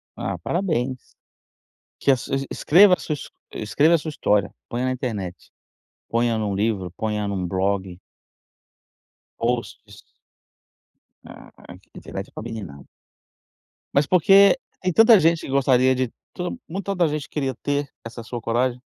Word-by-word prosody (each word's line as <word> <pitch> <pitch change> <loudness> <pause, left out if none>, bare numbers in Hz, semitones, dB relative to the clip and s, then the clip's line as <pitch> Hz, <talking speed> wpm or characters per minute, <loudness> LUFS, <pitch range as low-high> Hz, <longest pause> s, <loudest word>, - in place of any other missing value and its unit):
Ah, 95 -1 -4
parabéns. 130 - -1 1.0
Que 140 - +4
a - - +5
su 125 - -7
es 135 0 0
escreva 185 +4 +5
a - - -20
sua 150 - -3 0.4
escreva 145 +10 +2
a - - +4
sua 160 0 -5
história, 105 -9 +1 0.2
ponha 120 +2 -2
na 130 - 0
internet, 105 -8 -4 0.7
ponha 115 0 +1
num 105 -2 -1
livro, 100 -3 -1
ponha 105 -2 -2
num 95 -3 -2
blog 95 0 -2 1.4
posts. 120 +1 -3 1.3
Ah, - - -13 0.2
aqui - - -15
a - - -13
internet - - -7
com - - -8
a - - -6
menina 110 -10 -7 1.2
Mas 140 +1 +3
porque 195 - +6 0.2
tem 185 -1 0
tanta 225 +2 +7
gente 165 -1 +3
que - - -8
gostaria 130 -1 +3
de 130 -2 -1 0.2
to 180 +7 -5
mui 190 +5 -4
toda 185 -4 0
gente 150 -1 -3
queria 135 -4 -2
ter 145 +2 -2 0.2
essa 115 0 -8
sua 120 +1 -6
coragem. 120 +2 0
130 Hz, 150 wpm, -23 LUFS, 110-155 Hz, 1.4 s, tanta